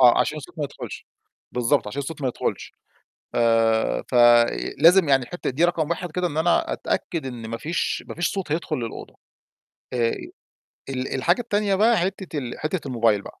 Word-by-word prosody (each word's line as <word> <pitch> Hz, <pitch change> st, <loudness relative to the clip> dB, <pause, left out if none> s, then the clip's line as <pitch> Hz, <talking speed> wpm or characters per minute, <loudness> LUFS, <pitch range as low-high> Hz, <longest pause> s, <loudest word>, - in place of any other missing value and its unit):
آه، 125 Hz, -2 st, +7 dB
عشان 155 Hz, -, 0 dB
الصوت 150 Hz, +2 st, -12 dB
ما 150 Hz, -, 0 dB
يدخلش. 140 Hz, -, -8 dB, 0.5 s
بالضبط، 125 Hz, +2 st, +2 dB
عشان 135 Hz, +7 st, -4 dB
الصوت 150 Hz, +1 st, -7 dB
ما 130 Hz, -, +1 dB
يدخلش. 125 Hz, -, -3 dB, 0.6 s
آآ، 115 Hz, -1 st, +2 dB
ف -, -, -7 dB, 0.6 s
لازم 165 Hz, +2 st, +6 dB
يعني 135 Hz, -2 st, +4 dB
الحتة 175 Hz, +9 st, -4 dB
دي 150 Hz, +7 st, +1 dB
رقم 165 Hz, -3 st, +1 dB
1 170 Hz, 0 st, -3 dB
كده، 180 Hz, +2 st, 0 dB
إن 155 Hz, -4 st, -5 dB
أنا 165 Hz, +2 st, +2 dB
أتأكد 165 Hz, -5 st, -2 dB
إن 120 Hz, -3 st, -6 dB
ما 115 Hz, -, -3 dB
فيش 165 Hz, +7 st, -2 dB
ما -, -, -6 dB
فيش 175 Hz, -, -1 dB
صوت 190 Hz, -6 st, -3 dB
هيدخل 165 Hz, +2 st, -1 dB
للأوضة. 115 Hz, -2 st, -6 dB, 0.8 s
آآ، 115 Hz, -2 st, +2 dB, 0.8 s
ال 130 Hz, -1 st, -3 dB
الحاجة 170 Hz, -, +2 dB
التانية 210 Hz, -4 st, 0 dB
بقى 225 Hz, +4 st, +4 dB
حتة 185 Hz, -3 st, -3 dB
ال 125 Hz, -4 st, -5 dB
حتة 155 Hz, +1 st, -3 dB
الموبايل 115 Hz, -5 st, +2 dB
بقى، -, -, -12 dB
150 Hz, 180 wpm, -24 LUFS, 125-175 Hz, 0.8 s, آه